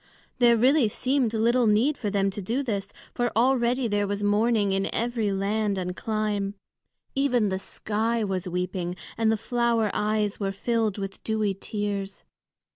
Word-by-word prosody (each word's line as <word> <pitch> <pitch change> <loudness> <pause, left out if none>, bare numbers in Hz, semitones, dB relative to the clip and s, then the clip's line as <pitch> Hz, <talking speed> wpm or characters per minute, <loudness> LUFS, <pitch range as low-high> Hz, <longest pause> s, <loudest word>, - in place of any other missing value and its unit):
There 235 -1 +6
really 260 +2 +4
seemed 255 +2 0
little 235 +2 +2
need 230 +8 +3
for 210 - -3
them 195 -1 +1
to 205 - -5
do 235 +9 -1
this, 205 -5 -3 0.2
for 240 -1 0
already 245 0 +2
there 205 -1 0
was 205 +1 -2
mourning 210 0 +2
in 195 0 0
every 230 -3 -1
land 200 +1 0
and 180 -1 -3
clime. 210 -2 -2 0.6
Even 250 -6 +2
the 190 0 -2
sky 220 +3 -1
was 190 -2 -2
weeping, 180 0 -2 0.2
and 225 -1 +2
the 220 - +1
flower 235 -1 +1
eyes 210 -1 0
were 195 -2 -1
filled 220 0 -1
with 195 -1 -6
dewy 215 -2 0
tears. 200 0 -4
215 Hz, 160 wpm, -26 LUFS, 200-235 Hz, 0.6 s, There